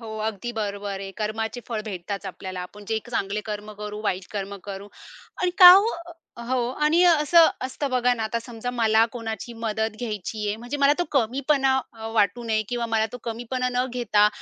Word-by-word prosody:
हो, 220 Hz, -1 st, -7 dB
अगदी 220 Hz, +2 st, -4 dB
बरोबर 200 Hz, -3 st, -4 dB
आहे. 195 Hz, 0 st, -6 dB
कर्माचे 220 Hz, +2 st, -3 dB
फळ 225 Hz, -3 st, -2 dB
भेटतात 195 Hz, 0 st, -5 dB
आपल्याला. 185 Hz, 0 st, -6 dB
आपण 205 Hz, +3 st, -9 dB
जे 220 Hz, -1 st, +1 dB
क -, -, -12 dB
चांगले 205 Hz, -3 st, -1 dB
कर्म 210 Hz, 0 st, -5 dB
करू, 210 Hz, 0 st, -5 dB
वाईट 185 Hz, -3 st, -2 dB
कर्म 200 Hz, -1 st, -4 dB
करू 200 Hz, 0 st, -7 dB, 0.5 s
आणि 365 Hz, -, +2 dB
का 360 Hz, -1 st, +12 dB
हो 405 Hz, +5 st, +5 dB, 0.6 s
हो 260 Hz, -, +1 dB, 0.3 s
आणि 325 Hz, +4 st, +4 dB
अ, 350 Hz, -, +7 dB
असं 330 Hz, +2 st, +7 dB, 0.2 s
असतं 270 Hz, +2 st, -3 dB
बघा 250 Hz, -1 st, +2 dB
ना, 230 Hz, -, -4 dB
आता 225 Hz, +2 st, -1 dB
समजा 235 Hz, 0 st, -5 dB
मला 225 Hz, -2 st, +3 dB
कोणाची 230 Hz, -1 st, -5 dB
मदत 220 Hz, 0 st, -1 dB
घ्यायची 215 Hz, -2 st, -4 dB
आहे. 205 Hz, -, -1 dB
म्हणजे 240 Hz, +5 st, -5 dB
मला 280 Hz, 0 st, +5 dB
तो 350 Hz, -, +1 dB
कमीपणा 270 Hz, +2 st, +2 dB, 0.2 s
अ, 220 Hz, -, -6 dB
वाटू 215 Hz, +2 st, +2 dB
नये 220 Hz, -1 st, +1 dB
किंवा 240 Hz, -1 st, -2 dB
मला 220 Hz, -1 st, +1 dB
तो 245 Hz, -, -6 dB
कमीपणा 240 Hz, +2 st, -2 dB
न 250 Hz, 0 st, +2 dB
घेता, 210 Hz, -4 st, +3 dB
225 Hz, 195 wpm, -24 LUFS, 210-250 Hz, 0.6 s, का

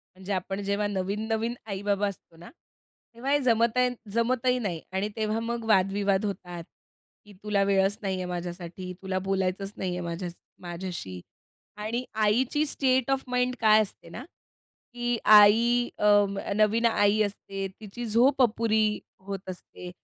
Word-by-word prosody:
म्हणजे 190 Hz, +2 st, -5 dB
आपण 195 Hz, +1 st, -3 dB
जेव्हा 200 Hz, +1 st, 0 dB
नवीन-नवीन 215 Hz, +4 st, -2 dB
आई-बाबा 205 Hz, 0 st, -1 dB
असतो 190 Hz, -4 st, -9 dB
ना, 170 Hz, -, -12 dB, 0.6 s
तेव्हा 250 Hz, +4 st, -3 dB
हे 290 Hz, -, +4 dB
जमतन 245 Hz, +1 st, +2 dB, 0.2 s
जमतही 250 Hz, +2 st, +1 dB
नाही 180 Hz, -8 st, -3 dB
आणि 190 Hz, +2 st, -1 dB
तेव्हा 215 Hz, 0 st, -1 dB
मग 230 Hz, 0 st, -3 dB
वाद-विवाद 195 Hz, 0 st, +2 dB
होतात; 180 Hz, -4 st, -5 dB, 0.6 s
की 205 Hz, -, -15 dB
तुला 210 Hz, -2 st, +1 dB
वेळच 195 Hz, +1 st, +2 dB
नाहीये 190 Hz, -2 st, -2 dB
माझ्यासाठी, 175 Hz, +1 st, -6 dB
तुला 190 Hz, -1 st, -2 dB
बोलायचंच 195 Hz, +1 st, -1 dB
नाहीये 180 Hz, -1 st, -3 dB
माझ्यास 170 Hz, +1 st, -5 dB, 0.3 s
माझ्याशी 175 Hz, -, -6 dB, 0.6 s
आणि 220 Hz, +4 st, -3 dB, 0.2 s
आईची 255 Hz, +8 st, +2 dB
स्टेट 260 Hz, -3 st, +1 dB
ऑफ 270 Hz, 0 st, +1 dB
माइंड 250 Hz, 0 st, 0 dB
काय 215 Hz, -1 st, +6 dB
असते 210 Hz, -, -7 dB
ना -, -, -8 dB, 0.7 s
की 240 Hz, 0 st, -1 dB
आई 225 Hz, +4 st, +6 dB
अं, 205 Hz, -1 st, +3 dB, 0.2 s
नवीन 215 Hz, +2 st, +3 dB
आई 210 Hz, -2 st, +3 dB
असते, 195 Hz, -1 st, -4 dB
तिची 220 Hz, +3 st, -7 dB
झोप 245 Hz, +5 st, +3 dB
अपुरी 220 Hz, -2 st, +1 dB, 0.2 s
होत 190 Hz, 0 st, -7 dB
असते, 180 Hz, 0 st, -9 dB
205 Hz, 140 wpm, -27 LUFS, 190-230 Hz, 0.7 s, काय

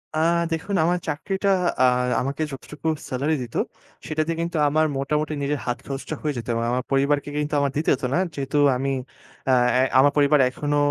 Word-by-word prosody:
আ 155 Hz, -, +1 dB, 0.3 s
দেখুন 165 Hz, +5 st, -2 dB
আমার 175 Hz, +1 st, +2 dB
চাকরিটা 195 Hz, +6 st, -1 dB, 0.3 s
আ -, -, +6 dB, 0.4 s
আমাকে 140 Hz, +4 st, -2 dB
যতটুকু 150 Hz, +3 st, -7 dB, 0.2 s
সেলারি 140 Hz, +5 st, 0 dB
দিত, 120 Hz, -2 st, -8 dB, 0.5 s
সেটাতে 155 Hz, +1 st, -1 dB
কিন্তু 170 Hz, 0 st, -2 dB
আমার 155 Hz, +2 st, +2 dB
মোটামুটি 150 Hz, +3 st, -1 dB
নিজের 140 Hz, +1 st, -1 dB
হাত 120 Hz, -1 st, -1 dB
খরচটা 135 Hz, +3 st, -5 dB
হয়ে 150 Hz, -1 st, -1 dB
যেত 120 Hz, -, -6 dB
এবং 115 Hz, 0 st, -1 dB
আমার 125 Hz, +1 st, 0 dB
পরিবারকে 140 Hz, +1 st, +1 dB
কিন্তু 150 Hz, 0 st, -1 dB
আমার 140 Hz, -1 st, +1 dB
দিতে 155 Hz, -, 0 dB
হত 130 Hz, -, -15 dB
না। -, -, +2 dB, 0.2 s
যেহেতু 140 Hz, +1 st, -2 dB, 0.2 s
আমি 135 Hz, +1 st, -1 dB, 0.6 s
অ্যা 130 Hz, -, +4 dB, 0.3 s
এ -, -, +5 dB, 0.2 s
আমার 145 Hz, +1 st, +6 dB
পরিবার 145 Hz, 0 st, +4 dB
এখনো 145 Hz, +3 st, -2 dB
145 Hz, 180 wpm, -23 LUFS, 135-155 Hz, 0.6 s, আ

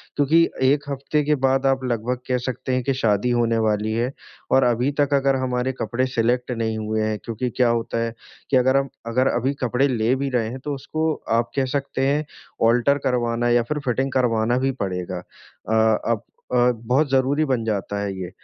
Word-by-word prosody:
क्योंकि 150 Hz, +3 st, +4 dB, 0.2 s
1 140 Hz, +2 st, +3 dB
हफ़्ते 140 Hz, +2 st, -1 dB
के 150 Hz, +1 st, +2 dB
बाद 135 Hz, +1 st, +2 dB
आप 135 Hz, -1 st, +2 dB
लगभग 120 Hz, +1 st, -1 dB
कह 125 Hz, -1 st, +1 dB
सकते 130 Hz, 0 st, -3 dB
हैं 125 Hz, -, 0 dB
कि 135 Hz, +2 st, 0 dB
शादी 110 Hz, -2 st, +1 dB
होने 115 Hz, -1 st, +2 dB
वाली 105 Hz, +1 st, 0 dB
है। 120 Hz, +3 st, 0 dB, 0.4 s
और 135 Hz, -, +5 dB
अभी 125 Hz, +3 st, +2 dB
तक 145 Hz, 0 st, +2 dB
अगर 135 Hz, -1 st, +3 dB
हमारे 125 Hz, 0 st, -1 dB
कपड़े 130 Hz, +2 st, 0 dB
सेलेक्ट 120 Hz, +2 st, +1 dB
नहीं 115 Hz, -2 st, -2 dB
हुए 110 Hz, 0 st, -1 dB
हैं 110 Hz, 0 st, -1 dB
क्योंकि 115 Hz, +2 st, -3 dB
क्या 125 Hz, -2 st, +4 dB
होता 115 Hz, 0 st, -1 dB
है 115 Hz, -, -3 dB, 0.4 s
कि 135 Hz, -, +4 dB
अगर 130 Hz, +2 st, +3 dB
हम 135 Hz, -1 st, 0 dB, 0.2 s
अगर 130 Hz, +3 st, +2 dB
अभी 130 Hz, +4 st, 0 dB
कपड़े 125 Hz, +3 st, +2 dB
ले 120 Hz, -2 st, +1 dB
भी 135 Hz, +1 st, -2 dB
रहे 120 Hz, -3 st, 0 dB
हैं 130 Hz, +3 st, -6 dB
तो 145 Hz, -, -3 dB
उसको 155 Hz, +4 st, -1 dB, 0.3 s
आप 115 Hz, -, -3 dB
कह 135 Hz, -1 st, +2 dB
सकते 135 Hz, -1 st, -2 dB
हैं 145 Hz, +2 st, +2 dB, 0.5 s
आल्टर 125 Hz, +4 st, +3 dB
करवाना 120 Hz, -1 st, 0 dB
या 120 Hz, 0 st, +3 dB
फिर 150 Hz, +5 st, -3 dB
फिटिंग 130 Hz, +2 st, 0 dB
करवाना 120 Hz, -2 st, +1 dB
ही 135 Hz, -, +2 dB
पड़ेगा, 90 Hz, -1 st, -4 dB, 0.5 s
अ, -, -, +1 dB, 0.4 s
अब 115 Hz, -3 st, -1 dB, 0.3 s
अ, 125 Hz, 0 st, +4 dB
बहुत 135 Hz, +6 st, +2 dB
ज़रूरी 135 Hz, +3 st, +2 dB
बन 125 Hz, -3 st, +1 dB
जाता 105 Hz, -1 st, -2 dB
है 100 Hz, -, -2 dB
ये। 90 Hz, -1 st, -5 dB
125 Hz, 200 wpm, -22 LUFS, 115-135 Hz, 0.5 s, और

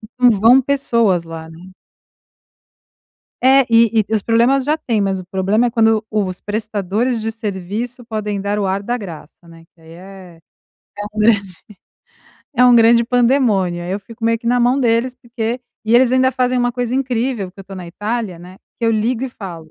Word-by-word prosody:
e 215 Hz, -, -12 dB, 0.2 s
não 245 Hz, -, +7 dB
vão 230 Hz, +5 st, +5 dB
pessoas 235 Hz, -10 st, +1 dB
lá, 165 Hz, -1 st, -9 dB
né. 175 Hz, +3 st, -14 dB, 1.7 s
É, 270 Hz, +1 st, +6 dB
e 230 Hz, -2 st, +4 dB
e -, -, +1 dB
os 215 Hz, -, +1 dB
problemas 240 Hz, +4 st, +2 dB
já 300 Hz, +3 st, +1 dB
têm, 235 Hz, -8 st, -2 dB
mas 195 Hz, -1 st, 0 dB
o 185 Hz, -, -8 dB
problema 195 Hz, +6 st, 0 dB
é -, -, -1 dB
quando 225 Hz, -2 st, +2 dB
os 195 Hz, -4 st, -2 dB
prestadores 215 Hz, +2 st, -2 dB
de 225 Hz, -, -2 dB
serviço 220 Hz, +4 st, -5 dB
podem 210 Hz, -2 st, -4 dB
dar 200 Hz, +1 st, -2 dB
o 200 Hz, -, -1 dB
ar 195 Hz, +1 st, -1 dB
da 240 Hz, +4 st, -2 dB
graça, 170 Hz, -3 st, -11 dB
né, 165 Hz, 0 st, -15 dB
que 165 Hz, -, -27 dB
aí 160 Hz, 0 st, -15 dB
é 185 Hz, -1 st, -13 dB, 0.6 s
é 205 Hz, -, -5 dB
um 215 Hz, -, -9 dB
grande 210 Hz, -1 st, +4 dB, 1.2 s
é 250 Hz, -, +5 dB
um 245 Hz, -1 st, +6 dB
grande 235 Hz, 0 st, +5 dB
pandemônio, 235 Hz, -8 st, +1 dB
aí 180 Hz, -, -4 dB
eu 200 Hz, -, -3 dB
fico 225 Hz, +3 st, -10 dB
meio 230 Hz, 0 st, +2 dB
que 230 Hz, -, -11 dB
na 245 Hz, -, +2 dB
mão 245 Hz, +3 st, +2 dB
deles, 235 Hz, +1 st, +1 dB
porque 240 Hz, -1 st, -4 dB, 0.2 s
e 225 Hz, -, +1 dB
eles 250 Hz, 0 st, +5 dB
ainda 260 Hz, 0 st, +3 dB
fazem 255 Hz, 0 st, 0 dB
uma 245 Hz, 0 st, 0 dB
coisa 245 Hz, -1 st, -3 dB
incrível, 245 Hz, -6 st, -2 dB
que 195 Hz, -, -13 dB
eu -, -, -11 dB
tô 195 Hz, +1 st, -10 dB
na 180 Hz, -2 st, -8 dB
Itália, 205 Hz, +1 st, -4 dB
né, 180 Hz, +2 st, -13 dB, 0.2 s
que -, -, -1 dB
eu 225 Hz, -, +3 dB
ligo 225 Hz, +3 st, 0 dB
e 265 Hz, -, -2 dB
falo: 170 Hz, -9 st, -10 dB
225 Hz, 200 wpm, -18 LUFS, 195-245 Hz, 1.7 s, não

